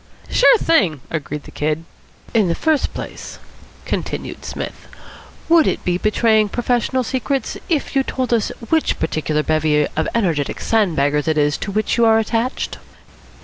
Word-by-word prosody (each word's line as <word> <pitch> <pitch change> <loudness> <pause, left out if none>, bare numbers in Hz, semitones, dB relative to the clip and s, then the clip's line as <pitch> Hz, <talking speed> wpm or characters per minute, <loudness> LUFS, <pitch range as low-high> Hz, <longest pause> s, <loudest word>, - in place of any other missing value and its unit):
"Sure - - +6
thing," 190 - +2
agreed 150 -2 -4
the - - -12
Kid. 155 +2 -2 0.5
"In 215 -4 +3
the 170 - 0
first 315 -3 +1
place," - - -8 0.5
continued - - -4
Psmith, - - -6 0.6
"would 330 -2 +5
it - - -1
be 180 0 +1
betraying 215 0 +3
professional 245 +3 0
secrets 260 +1 -2
if 305 -4 -1
you 270 - +4
told 255 -2 -2
us 225 -3 +1 0.2
which 320 -1 +2
particular 155 -1 -1
bevy 155 -1 +2
of 160 - 0
energetic 165 -11 0
sandbaggers 150 -9 +1
it 155 -1 +1
is 145 0 +2
to 200 - -4
which 215 +4 0
you 235 - +4
are 220 0 +5
attached?" 225 +3 -1
215 Hz, 150 wpm, -19 LUFS, 155-250 Hz, 0.6 s, Sure